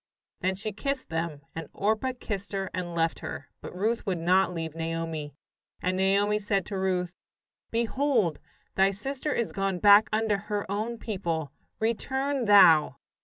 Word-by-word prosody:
Then 185 Hz, +1 st, 0 dB
she 215 Hz, +3 st, -4 dB
kissed 275 Hz, +6 st, -3 dB
them, 165 Hz, -3 st, -3 dB
and 165 Hz, -2 st, -6 dB
Orpah 220 Hz, +5 st, 0 dB
kissed 200 Hz, -1 st, -5 dB
her 195 Hz, -1 st, -2 dB
and 175 Hz, -2 st, -4 dB
left 165 Hz, 0 st, 0 dB
her, 135 Hz, -, -7 dB
but -, -, -8 dB
Ruth 220 Hz, +5 st, 0 dB
would 185 Hz, -2 st, 0 dB
not 180 Hz, +3 st, +3 dB
leave 165 Hz, -3 st, -4 dB
Naomi. 165 Hz, -3 st, -4 dB, 0.4 s
And 185 Hz, +1 st, -1 dB
Naomi 200 Hz, +2 st, +2 dB
said 200 Hz, -3 st, 0 dB
to 200 Hz, -, -4 dB
Ruth: 180 Hz, -2 st, 0 dB, 0.6 s
"Behold, 230 Hz, -, +1 dB, 0.3 s
thy 195 Hz, 0 st, +4 dB
sister 270 Hz, +9 st, -3 dB
is 235 Hz, -5 st, -1 dB
gone 195 Hz, -1 st, -1 dB
back 205 Hz, +2 st, +7 dB
unto 215 Hz, -1 st, +1 dB
her 205 Hz, 0 st, -3 dB
own 220 Hz, +4 st, -2 dB
people; 170 Hz, -, -3 dB, 0.3 s
return 265 Hz, +4 st, -1 dB
thou!" 185 Hz, -7 st, +7 dB
195 Hz, 155 wpm, -28 LUFS, 170-220 Hz, 0.6 s, back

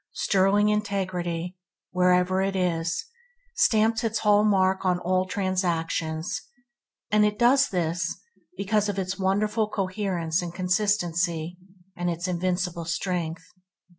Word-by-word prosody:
Sterling 200 Hz, +2 st, +2 dB
integrity 185 Hz, -5 st, -2 dB
tell 180 Hz, -1 st, -57 dB
wherever 180 Hz, +1 st, +3 dB
it 195 Hz, 0 st, -1 dB
is, 170 Hz, -, -1 dB
and 485 Hz, +1 st, -34 dB
stamps 220 Hz, +1 st, +3 dB
it 225 Hz, -1 st, 0 dB
hall 210 Hz, -1 st, +4 dB
mark 190 Hz, -2 st, +2 dB
on 180 Hz, -1 st, +2 dB
all 185 Hz, +1 st, 0 dB
transactions; 170 Hz, -4 st, -1 dB, 0.7 s
and 210 Hz, 0 st, +4 dB
it 210 Hz, 0 st, +1 dB
does 260 Hz, +4 st, +4 dB
this 170 Hz, -1 st, -1 dB, 0.4 s
because 210 Hz, +1 st, +1 dB
of 200 Hz, -, -3 dB
its 185 Hz, 0 st, -3 dB
wonderful 210 Hz, +3 st, +1 dB
coherence 185 Hz, -4 st, -1 dB
and 175 Hz, -1 st, -6 dB
consistency, 175 Hz, -3 st, 0 dB, 0.4 s
and 175 Hz, 0 st, -2 dB
its 170 Hz, +2 st, -3 dB
invincible 180 Hz, -1 st, -2 dB
strength. 165 Hz, -1 st, -2 dB
185 Hz, 125 wpm, -26 LUFS, 175-210 Hz, 0.7 s, hall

